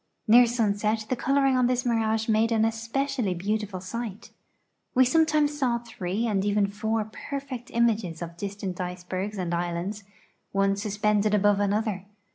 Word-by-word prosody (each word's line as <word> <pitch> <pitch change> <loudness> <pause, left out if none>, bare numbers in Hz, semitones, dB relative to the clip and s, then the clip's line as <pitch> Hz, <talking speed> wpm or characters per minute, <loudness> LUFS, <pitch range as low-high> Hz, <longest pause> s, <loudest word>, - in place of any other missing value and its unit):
Near 240 +2 +7
sunset 215 -2 0
the 255 - +1
coloring 275 +1 +2
on 250 -1 +3
this 250 +1 0
mirage 225 -2 +1
made 225 +1 +2
an 220 -1 +3
especially 230 -1 -1
beautiful 205 +1 -2
sight. 210 +2 -6 0.6
We 260 +1 +6
sometimes 300 +1 +3
saw 255 -5 +1
three 225 -3 -3
and 200 -4 0
even 205 0 +2
four 220 +1 -1
perfect 260 +2 -6
images 215 -8 +1
of 170 0 -8
distant 195 -1 -5
icebergs 185 +3 -4
and 175 -2 -2
islands, 175 +4 -3 0.5
one 195 0 +2
suspended 210 +1 +1
above 205 0 +3
another. 205 -1 -1
215 Hz, 145 wpm, -26 LUFS, 195-235 Hz, 0.6 s, Near